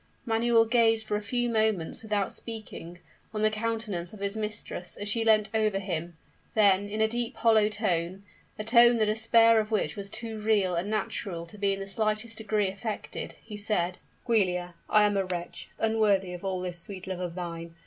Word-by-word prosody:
Manuel 230 Hz, 0 st, +3 dB
gazed 225 Hz, -1 st, +3 dB
for 210 Hz, -, -1 dB
a 210 Hz, -, -1 dB
few 240 Hz, +3 st, -1 dB
moments, 220 Hz, -6 st, 0 dB
without 210 Hz, -3 st, -1 dB
speaking, 215 Hz, -6 st, -8 dB, 0.4 s
on 215 Hz, -, -1 dB
the 215 Hz, -, +4 dB
countenance 215 Hz, -5 st, -3 dB
of 215 Hz, -, -10 dB
his 200 Hz, +1 st, -1 dB
mistress 210 Hz, -4 st, -5 dB
as 205 Hz, -, -5 dB
she 225 Hz, +2 st, +1 dB
leant 215 Hz, -1 st, +3 dB
over 215 Hz, -2 st, +2 dB
him: 175 Hz, -4 st, -4 dB, 0.4 s
then, 205 Hz, -2 st, +4 dB
in 215 Hz, +1 st, -2 dB
a 220 Hz, -, +5 dB
deep, 235 Hz, +1 st, -2 dB
hollow 220 Hz, -2 st, +4 dB
tone 190 Hz, -3 st, -1 dB, 0.3 s
a 215 Hz, -, -3 dB
tone 235 Hz, +1 st, +6 dB
the 220 Hz, -, +3 dB
despair 225 Hz, +1 st, +5 dB
of 215 Hz, 0 st, -2 dB
which 215 Hz, -2 st, 0 dB
was 200 Hz, -1 st, -6 dB
too 220 Hz, +1 st, -6 dB
real 210 Hz, -4 st, +2 dB
and 175 Hz, +4 st, -1 dB
natural 195 Hz, -5 st, -3 dB
to 190 Hz, +5 st, -13 dB
be 200 Hz, -1 st, +2 dB
in 195 Hz, -, -5 dB
the 195 Hz, -, -4 dB
slightest 215 Hz, +3 st, -1 dB
degree 215 Hz, -2 st, 0 dB
affected, 205 Hz, +3 st, -5 dB
he 215 Hz, -, -8 dB
said, 200 Hz, -4 st, -1 dB, 0.3 s
"Giulia, 180 Hz, -7 st, +1 dB, 0.2 s
I 210 Hz, -1 st, +5 dB
am 205 Hz, -1 st, +2 dB
a 195 Hz, -, +1 dB
wretch, 175 Hz, -1 st, -5 dB
unworthy 210 Hz, -4 st, +2 dB
of 180 Hz, -, -8 dB
all 190 Hz, -2 st, -2 dB
this 180 Hz, -1 st, -5 dB
sweet 185 Hz, +1 st, -8 dB
love 190 Hz, -1 st, -4 dB
of 175 Hz, -2 st, -4 dB
thine! 170 Hz, -2 st, -6 dB
210 Hz, 195 wpm, -28 LUFS, 190-220 Hz, 0.4 s, tone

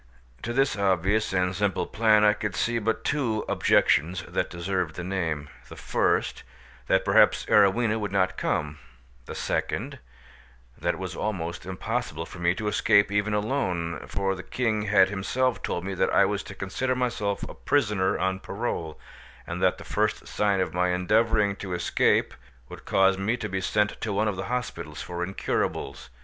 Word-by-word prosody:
To 120 Hz, -, -4 dB
this 135 Hz, +3 st, +2 dB
obvious 100 Hz, +2 st, +1 dB
and 90 Hz, -1 st, 0 dB
simple 105 Hz, -1 st, 0 dB
plan 110 Hz, -1 st, +3 dB
I 105 Hz, 0 st, +6 dB
could 105 Hz, -2 st, -4 dB
see 120 Hz, 0 st, 0 dB
but 115 Hz, +1 st, -1 dB
two 120 Hz, -7 st, 0 dB
objections 90 Hz, +4 st, +2 dB
that -, -, -2 dB
deserved 90 Hz, -1 st, -2 dB
the 90 Hz, -, -5 dB
name,—the 80 Hz, -6 st, -4 dB
first, -, -, 0 dB, 0.5 s
that -, -, +2 dB
perhaps -, -, +4 dB
Arowhena 110 Hz, +3 st, +3 dB
would 105 Hz, -2 st, -3 dB
not 95 Hz, -2 st, +1 dB
come; 75 Hz, 0 st, -2 dB, 0.5 s
the -, -, -6 dB
second, -, -, -2 dB, 0.8 s
that -, -, -1 dB
it -, -, -10 dB
was -, -, -5 dB
almost 90 Hz, -5 st, -4 dB
impossible 95 Hz, -3 st, -3 dB
for 85 Hz, -, -11 dB
me 85 Hz, +1 st, +2 dB
to 105 Hz, -, -4 dB
escape 100 Hz, -1 st, +3 dB
even 105 Hz, +1 st, +1 dB
alone, 95 Hz, -8 st, -1 dB
for 100 Hz, -1 st, -1 dB
the 90 Hz, -, -6 dB
king 110 Hz, 0 st, -1 dB
had 95 Hz, -3 st, +5 dB
himself 120 Hz, +6 st, -1 dB
told 90 Hz, -, -3 dB
me 100 Hz, -, -3 dB
that 95 Hz, -, +1 dB
I -, -, +5 dB
was -, -, -1 dB
to -, -, -9 dB
consider 130 Hz, +7 st, -2 dB
myself 120 Hz, -5 st, -1 dB
a -, -, -8 dB
prisoner 105 Hz, -9 st, +1 dB
on 95 Hz, 0 st, -1 dB
parole, 80 Hz, -4 st, -4 dB, 0.5 s
and -, -, -5 dB
that -, -, +3 dB
the -, -, -10 dB
first 105 Hz, 0 st, -1 dB
sign 100 Hz, -2 st, +1 dB
of 80 Hz, -4 st, -2 dB
my 90 Hz, +1 st, +1 dB
endeavouring 105 Hz, +3 st, +2 dB
to 95 Hz, -2 st, -5 dB
escape 85 Hz, -, +2 dB, 0.4 s
would -, -, -11 dB
cause 95 Hz, 0 st, +3 dB
me 110 Hz, +5 st, 0 dB
to 110 Hz, -, -4 dB
be 95 Hz, -1 st, -3 dB
sent 105 Hz, +2 st, 0 dB
to 110 Hz, -, -2 dB
one 105 Hz, +2 st, +1 dB
of 105 Hz, -, -1 dB
the 95 Hz, -, -4 dB
hospitals 125 Hz, -11 st, -4 dB
for 90 Hz, 0 st, -4 dB
incurables. 95 Hz, -8 st, -3 dB
100 Hz, 175 wpm, -26 LUFS, 90-110 Hz, 0.8 s, I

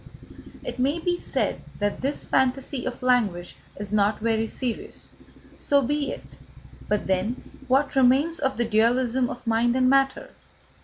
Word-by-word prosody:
It -, -, -6 dB
may 275 Hz, +5 st, +1 dB
be 350 Hz, +1 st, 0 dB
said -, -, -2 dB, 0.2 s
that 205 Hz, 0 st, -2 dB
this 275 Hz, +2 st, -2 dB
fantasy 265 Hz, 0 st, 0 dB
of 255 Hz, 0 st, -6 dB
language 210 Hz, -9 st, +1 dB, 0.2 s
is 205 Hz, 0 st, -5 dB
not 210 Hz, 0 st, +2 dB
very 225 Hz, 0 st, 0 dB
serious. 245 Hz, 0 st, -5 dB, 0.5 s
So 280 Hz, -1 st, +2 dB
be 290 Hz, +3 st, -1 dB
it. -, -, -7 dB, 0.7 s
But 210 Hz, -1 st, 0 dB
then 190 Hz, +6 st, -1 dB, 0.2 s
what 275 Hz, +3 st, +2 dB
remains 270 Hz, +6 st, +3 dB
of 265 Hz, -2 st, -1 dB
the 240 Hz, -, +1 dB
dualism 240 Hz, +3 st, +2 dB
of 245 Hz, -, -8 dB
mind 230 Hz, +1 st, +2 dB
and 255 Hz, 0 st, +3 dB
matter? 270 Hz, 0 st, +1 dB
250 Hz, 150 wpm, -25 LUFS, 225-270 Hz, 0.7 s, remains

